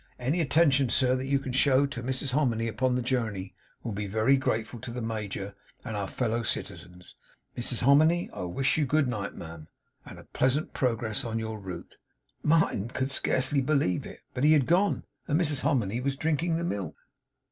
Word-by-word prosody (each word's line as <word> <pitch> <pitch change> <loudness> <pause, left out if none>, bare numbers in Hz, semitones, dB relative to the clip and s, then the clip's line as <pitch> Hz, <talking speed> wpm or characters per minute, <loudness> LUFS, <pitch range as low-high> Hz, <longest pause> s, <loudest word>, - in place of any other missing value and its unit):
Any 135 +8 0
attention, 145 -4 +3
sir, 130 +1 +3
that 130 +1 -3
you 140 0 +3
can 135 -2 -5
show 135 +1 +4
Toe 125 -3 -5
Mrs 130 +2 -2
Hominy 120 -5 +1
upon 125 +3 0
the 125 - -1
journey, 110 -7 -2 0.3
will 115 - -3
be 105 0 -3
very 110 +7 +3
grateful 115 -3 -2
Toe 125 +1 -7
the 125 - -5
Major 105 -3 -4 0.3
and 115 -4 -4
our 100 -2 -2
fellow 115 0 -1
citizens. 90 -4 -5 0.4
Mrs 120 0 -1
Hominy, 155 +6 +4
I - - -6
wish 135 - 0
you 145 - +1
good 150 0 +2
night, 105 -5 -3
ma'am, 80 -2 -9 0.4
and - - -11
a - - -12
pleasant 130 +4 0
pro 125 -3 +1
gress 110 +2 -3
on 115 -2 -3
your 110 -1 -4
route!' 95 -3 -8 0.4
Martin 150 -9 +2
could 130 +3 -2
scarcely 135 +1 +2
believe 135 - +1
it; - - -12
but 125 - -2
he 155 +1 +6
had 145 -4 +4
gone, 185 +7 +2 0.2
and 155 -1 +2
Mrs 150 -5 +1
Hominy 120 -6 0
was 135 +1 -1
drinking 160 +3 0
the 170 - -3
milk. 100 - -3
125 Hz, 190 wpm, -28 LUFS, 110-140 Hz, 0.4 s, he